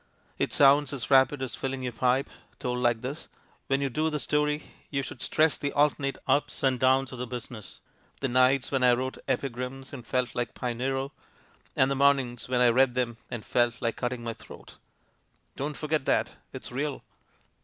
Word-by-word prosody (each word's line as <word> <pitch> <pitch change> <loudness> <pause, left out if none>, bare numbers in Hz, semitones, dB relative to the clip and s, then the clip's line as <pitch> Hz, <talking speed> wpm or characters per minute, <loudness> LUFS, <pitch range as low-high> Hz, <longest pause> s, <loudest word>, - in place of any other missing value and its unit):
It - - 0
sounds 140 0 +5
as 135 0 -4
rapid 135 +1 +5
as 130 - -4
filling 135 -1 -3
your 125 - -2
pipe, 125 +3 +1 0.3
told 125 0 -2
like 120 -2 +2
this; 140 +5 -5 0.4
when 135 0 +1
you 140 - 0
do 155 +4 +1
the 150 - -2
story 150 +1 0 0.2
you 140 -2 -1
should 130 - -8
stress 155 +4 +2
the 145 - -1
alternate 145 -1 +1
ups 145 +2 +1
and 130 -2 +2
downs 130 0 +3
of 125 - -8
the 125 - -3
busi 120 0 -6
ness: 110 -5 -10 0.4
the 135 - 0
nights 130 +1 +3
when 135 -2 +1
I 125 -1 +6
wrote 130 +2 -2
epigrams 130 0 -3
and 130 -4 -7
felt 125 +2 -1
like 120 -2 -3
Pinero, 135 +3 -2 0.6
and 130 +1 +3
the - - +1
mornings 135 -4 +2
when 125 -1 +2
I 125 - +6
read 125 +1 +3
'em 120 -2 0
and 120 -4 -6
felt 120 -1 +1
like 115 -1 -1
cutting 120 -1 -3
my 115 -1 -3
throat. - - -13 0.8
Don't 145 +1 -4
forget 155 -2 -1
that. - - +1 0.2
It's - - -8
real." 140 +2 -3
130 Hz, 190 wpm, -28 LUFS, 125-140 Hz, 0.8 s, I